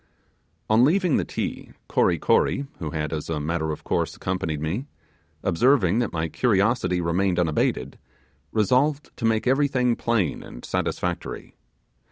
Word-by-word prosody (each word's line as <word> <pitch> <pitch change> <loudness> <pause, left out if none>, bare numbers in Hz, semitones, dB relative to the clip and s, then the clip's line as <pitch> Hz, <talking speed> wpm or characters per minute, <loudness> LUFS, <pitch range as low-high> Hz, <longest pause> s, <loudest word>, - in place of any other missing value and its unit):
On 110 +2 +5
leaving 175 +2 +3
the - - +1
Ti, - - -5
Kory - - +2
Kory, 140 - +2
who 80 - -3
had 75 0 -3
as 75 0 -4
a 80 -2 -1
matter 80 +1 -1
of 75 - -6
course - - -1
accompanied 85 -5 -2
me, 90 - -3 0.6
observing 105 +1 +3
that 120 - 0
my 80 0 -1
curiosity 100 -1 +1
remained 90 +2 +1
unabated, 75 -5 0 0.5
resolved 130 +7 +1
to 115 - -3
make 110 -1 +2
everything 130 -2 +2
plain 115 -9 0
and - - -10
satisfactory. 90 -1 -3
95 Hz, 140 wpm, -24 LUFS, 80-125 Hz, 0.6 s, On